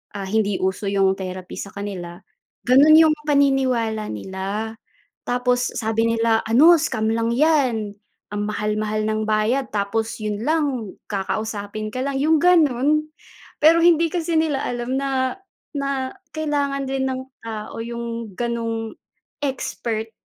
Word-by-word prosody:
ah, 195 -1 -4
hindi 205 0 +1
uso 190 +2 -1
yung 195 -1 +2
therapy 185 -1 -6
sa 200 - -6
kanila, 185 -4 -6 0.5
ganun 280 +5 +7
yung 315 -1 +5
paniniwala 260 -7 +2
nila. 195 - -4 0.5
Tapos 245 0 +1
sabi 225 0 +1
nila, 225 -1 +2
ano 280 +10 +7
scam 220 -6 -1
lang 230 0 0
'yan. 245 -6 +2 0.4
Ang 205 0 -2
mahal-mahal 215 0 -1
ng 215 0 -1
bayad, 220 +5 +1
tapos 210 +2 -2
yun 210 -1 -3
lang 275 -6 -1
kakausapin 210 +1 -4
ka 255 - -3
lang, 275 +1 -2
yung 305 +3 +3
ganun. 305 -3 +3 0.5
Pero 330 +2 +6
hindi 335 -1 +5
kasi 335 0 -2
nila 300 -4 0
alam 245 +1 -2
na 265 0 -1 0.4
na 275 -2 -2 0.2
kailangan 290 -3 -1
din 270 0 -1
ng 260 0 -3 0.2
tao 220 -2 -6
yung 235 -2 -5
ganung 230 -2 -2 0.5
expert 225 -4 -3
230 Hz, 130 wpm, -22 LUFS, 215-275 Hz, 0.5 s, ganun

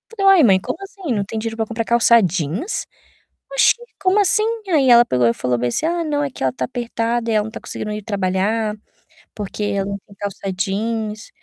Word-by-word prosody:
Falei: 395 -3 -1
"Uai, 320 - +6
mãe 195 -5 +5
como - - -4
assim, 390 -7 -5
não 205 -3 0
tem 220 - -6
dinheiro 225 0 -4
pra 225 - 0
comprar 225 +1 -3
calça 235 0 +5
jeans? 180 - -2 0.7
Oxe, - - +5 0.3
como 380 +2 +3
assim?" 405 +2 +3 0.3
Aí 290 -7 +3
ela 240 0 +8
pegou 125 - +2
e 115 - +3
falou 125 0 -1
bem 125 +1 -1
assim: 120 - -1
"Ah, 340 +1 0
não, 295 -2 -1
é 285 - -1
que 255 - -7
ela 130 -1 +1
tá 130 - -2
apertada 235 - -2
e - - +1
ela 215 -1 +3
não 220 - -7
tá - - -7
conseguindo 215 - -6
ir 210 0 -5
trabalhar, 200 +2 -1 0.6
porque 210 0 -4
ela 200 -1 -1
não 200 0 -4
tem 200 - -17
calça 195 -1 -4
jeans", 215 +2 -2
220 Hz, 220 wpm, -20 LUFS, 195-240 Hz, 0.7 s, ela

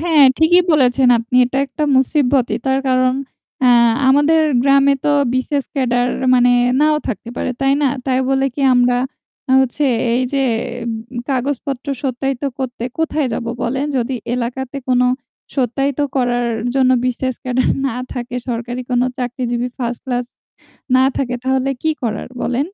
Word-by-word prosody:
হ্যাঁ 320 -3 +4 0.2
ঠিকই 345 +3 +5
বলেছেন 260 -3 +3
আপনি। 230 +2 -2
এটা 255 +2 -2
একটা 280 +3 -3
মুসিবতই 260 -4 +2
তার 265 0 +2
কারণ 255 0 +2 0.5
আ - - +5 0.4
আমাদের 290 +4 +4 0.2
গ্রামে 275 0 +4
তো - - +2 0.2
BCS 260 +1 -1
ক্যাডার 245 -3 +1 0.3
মানে 245 0 +4 0.3
নাও 305 0 +3
থাকতে 230 0 -5
পারে - - -2
তাই 270 0 +3
না? - - +4 0.2
তাই 260 -1 +1
বলে 270 0 +2
কি - - -5
আমরা 245 0 +3 0.6
হচ্ছে 265 +3 0 0.3
এইযে 255 +3 -1 0.5
উম 230 - -2 0.3
কাগজপত্র 270 0 -2 0.2
সত্যায়িত 270 0 -2 0.2
করতে 255 -3 -5 0.2
কোথায় 310 -3 0
যাব 235 - -3 0.2
বলেন? 270 +4 -1
যদি 255 +1 -1 0.2
এলাকাতে 250 +2 -4
কোনো 250 0 +3 0.5
সত্যায়িত 270 +2 0 0.2
করার 245 -2 +1 0.3
জন্য 260 -1 +3
BCS 255 0 -2
ক্যাডার 255 0 0 0.2
না 250 -3 -3 0.2
থাকে 245 0 -6
সরকারি 240 +1 -3
কোনো 245 0 +2
চাকরিজীবী 245 -1 -2
1st 240 -1 -3
ক্লাস 245 -1 -2 0.7
না 260 - +4
থাকে 250 -2 -1
তাহলে 265 +1 0
কি 315 - +2
করার 220 -3 -3
বলেন? 245 +1 -1
255 Hz, 145 wpm, -18 LUFS, 245-275 Hz, 0.7 s, ঠিকই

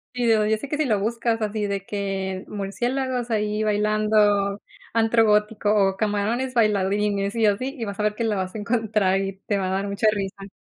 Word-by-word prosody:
Sí, 245 -1 0
yo 220 -2 +4
yo 220 0 +2
sé 275 - -7
que 295 - -2
si 310 - +1
lo 215 -5 +1
buscas 230 +1 -1
así 210 -1 -2
de 200 -1 -3
que 195 -2 -3
murciélagos 245 +5 -2
ahí 210 -1 0
bailando, 210 -1 +2 0.3
antro 225 0 +3
gótico 210 0 +2 0.2
o 190 - -6
camarones 220 +5 -1
bailarines 205 -1 +1
y 225 -1 +2
así, 255 +7 0
y 230 - -3
vas 200 0 -6
a - - 0
ver 210 0 +1
que 230 - -2
lo 215 -2 0
vas 185 +1 -3
a - - -3
encontrar 210 -3 +1
y 195 0 -3
te 205 -2 0
va 185 - -1
a - - -2
dar 195 +1 -1
mucha 200 +2 0
risa. 195 -1 -5
210 Hz, 210 wpm, -23 LUFS, 200-225 Hz, 0.3 s, yo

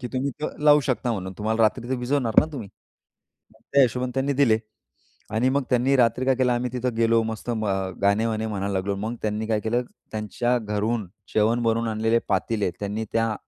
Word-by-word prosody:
की 125 - -5
तुम्ही 135 +2 -1 0.3
लावू 150 0 +7
शकता 125 -3 -1
म्हणून 95 -2 -4
तुम्हाला 110 +2 +1
रात्री 110 +2 +1
तर - - +2
विझवणार 125 -3 0
ना - - -1
तुम्ही. 115 -8 -6 0.8
मग - - -25
त्या 140 - +6
हिशोबाणी 125 0 0
त्यांनी 135 +1 +1
दिले. 125 -6 +3 0.8
आणि 120 +4 +2
मग 140 +1 +1
त्यांनी 125 +2 +3
रात्री 125 +1 +2
काय 135 0 +3
केलं 125 -1 +2
आम्ही 120 0 -1
तिथं 125 -1 -2
गेलो 115 0 +3
मस्त 110 +2 -5
अ, 120 - 0 0.5
गाणे 100 +3 +3
वाणे 110 0 -1
म्हणायला 100 -2 -2
लागलो. 95 +1 -1
मग 110 +4 -3
त्यांनी 110 0 -1
काय 110 -1 +1
केलं 120 +3 0 0.3
त्यांच्या 110 +3 -1
घरून 105 0 -2 0.3
जेवण 115 +3 +2
बनवून 115 0 +1
आणलेले 110 +1 +2
पातीले 105 -5 0
त्यांनी 105 +2 -3
त्या 115 -1 +1
115 Hz, 190 wpm, -24 LUFS, 110-125 Hz, 0.8 s, लावू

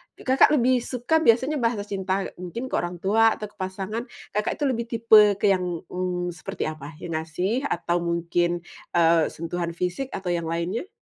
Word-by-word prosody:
Kakak 260 +1 +4
lebih 255 -1 +3
suka 250 +6 0
biasanya 265 +2 +3
bahasa 230 -3 0
cinta, 195 -1 -2 0.2
mungkin 235 +9 -6
ke - - 0
orang 175 0 -5
tua 225 +3 +4
atau 210 -1 -7
ke - - -32
pasangan, 195 +5 -4 0.2
Kakak 210 +1 -1
itu 295 - -4
lebih 235 -4 0
tipe 220 -3 +6
ke 200 0 +2
yang, 180 -3 -1
mmm, 180 -1 -2
seperti 165 -4 -5
apa? 150 0 -10
Yang 175 - -5
ngasih 180 +7 -2
atau 175 0 0
mungkin, 170 0 0 0.3
eee, 165 -1 +4
sentuhan 170 +1 -4
fisik 180 +10 -2
atau 185 -2 -3
yang 170 -1 -1
lainnya? 170 - -2
190 Hz, 175 wpm, -25 LUFS, 175-230 Hz, 0.3 s, tipe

